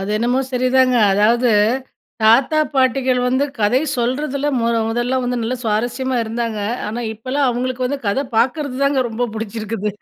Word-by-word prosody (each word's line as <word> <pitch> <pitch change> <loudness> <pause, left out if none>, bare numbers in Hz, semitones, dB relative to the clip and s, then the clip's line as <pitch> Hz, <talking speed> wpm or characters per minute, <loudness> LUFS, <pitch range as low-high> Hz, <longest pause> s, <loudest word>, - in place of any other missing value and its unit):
அது 195 +2 -4
என்னமோ 240 +4 +1
சரிதாங்க. 255 0 +3 0.2
அதாவது 230 +4 +3 0.7
தாத்தா, 255 +8 +4 0.2
பாட்டிகள் 260 -1 +2
வந்து 260 +3 +1
கதை 220 +5 +2 0.2
சொல்றதுல 280 +4 -1
முத 230 0 +1
முதல்ல 240 +3 -1
வந்து 245 0 -1
நல்ல 230 +3 -1
சுவாரஸ்யமா 240 +4 -1
இருந்தாங்க. 225 -1 -3 0.3
ஆனா, 225 +3 -4
இப்பல்லாம் 260 +5 -1
அவுங்களுக்கு 255 +1 -2
வந்து 280 +2 -3
கத 205 +7 0
பார்க்கறதுதாங்க 275 +1 +1
ரொம்ப 230 +2 -2
புடிச்சிருக்குது. 220 -1 -4
245 Hz, 140 wpm, -19 LUFS, 225-260 Hz, 0.7 s, தாத்தா